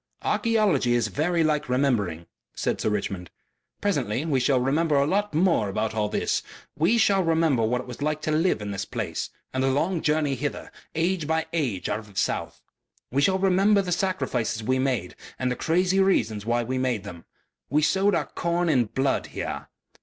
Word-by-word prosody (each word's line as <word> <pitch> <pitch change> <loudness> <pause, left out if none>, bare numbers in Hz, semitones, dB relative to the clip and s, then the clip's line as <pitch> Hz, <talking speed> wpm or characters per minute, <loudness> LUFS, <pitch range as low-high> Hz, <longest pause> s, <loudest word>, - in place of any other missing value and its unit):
"Archaeology 205 - +2
is 115 -3 +1
very 165 - +1
like 150 -3 0
remembering," 115 - 0 0.3
said - - -1
Sir - - +1
Richmond. 100 -4 -3 0.5
"Presently 140 - 0
we 145 -5 +1
shall 130 +1 +2
remember 150 +5 +1
a 140 0 +4
lot 205 +2 0
more 165 - +3
about 110 +3 -1
all 105 -1 0
this. - - 0 0.3
We 170 +10 +3
shall 200 -4 +3
remember 160 -6 +2
what 120 +3 +1
it - - -11
was 125 +2 -8
like 150 +1 0
to 155 - 0
live 155 - +1
in 100 - -4
this 100 0 -3
place, - - -4 0.2
and 130 0 0
the 135 - +3
long 160 +6 0
journey 150 -2 +1
hither, 145 +2 -4 0.2
age 165 -1 0
by 160 0 +1
age 130 - -1
out - - -1
of 105 -2 -13
the 95 - -3
south. - - -2 0.5
We 135 +3 +1
shall 190 +5 +3
remember 195 +2 +3
the 180 - -4
sacrifices 130 - -1
we 130 +4 +1
made 125 -9 -1 0.2
and 130 -1 -1
the - - -1
crazy 180 +5 +1
reasons 110 - +1
why 120 0 +1
we 130 +2 -2
made 125 -6 0
them. 85 -2 -10 0.4
We 150 +3 +2
sowed 190 +4 +3
our - - 0
corn 170 0 -1
in 130 -6 +3
blood 135 +5 -1
here. - - -5
140 Hz, 190 wpm, -25 LUFS, 120-170 Hz, 0.5 s, a